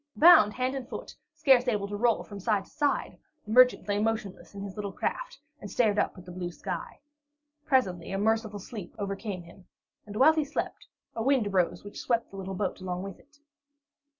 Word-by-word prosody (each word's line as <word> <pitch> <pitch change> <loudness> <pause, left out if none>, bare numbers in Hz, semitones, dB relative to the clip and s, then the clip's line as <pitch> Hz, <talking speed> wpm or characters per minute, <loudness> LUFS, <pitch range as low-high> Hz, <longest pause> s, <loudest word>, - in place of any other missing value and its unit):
Bound 320 -11 +8
hand 255 +1 0
and 265 -3 -5
foot, - - -7 0.2
scarce 260 -3 +4
able 205 -4 0
to 205 - -5
roll 230 +2 +2
from 205 -1 -9
side 200 -1 0
to - - -22
side, 290 -1 -1 0.3
the 210 - -7
merchant 250 0 +5
lay 205 0 +1
motionless 215 -3 -3
in 200 - -6
his 200 -2 -7
little 205 -2 -4
craft - - -3 0.2
and 205 - -8
stared 210 0 +2
up - - 0
at 180 - -12
the 180 - -9
blue 175 0 -4
sky. 175 -1 -6 0.7
Presently 190 - +1
a 195 - -1
merciful 220 0 +1
sleep 200 -2 -8
overcame 195 -2 -4
him, 175 +2 -16 0.4
and 205 - -8
while 275 +8 +6
he 315 -1 +1
slept, 290 +1 -4 0.3
a 225 - -2
wind 260 -1 +3
arose 190 -4 0
which 205 - -9
swept 230 -1 0
the 195 - -9
little 190 0 -5
boat 190 -1 -2
along 180 0 -3
with 195 -2 -8
it. 290 0 -25
210 Hz, 205 wpm, -28 LUFS, 195-250 Hz, 0.7 s, Bound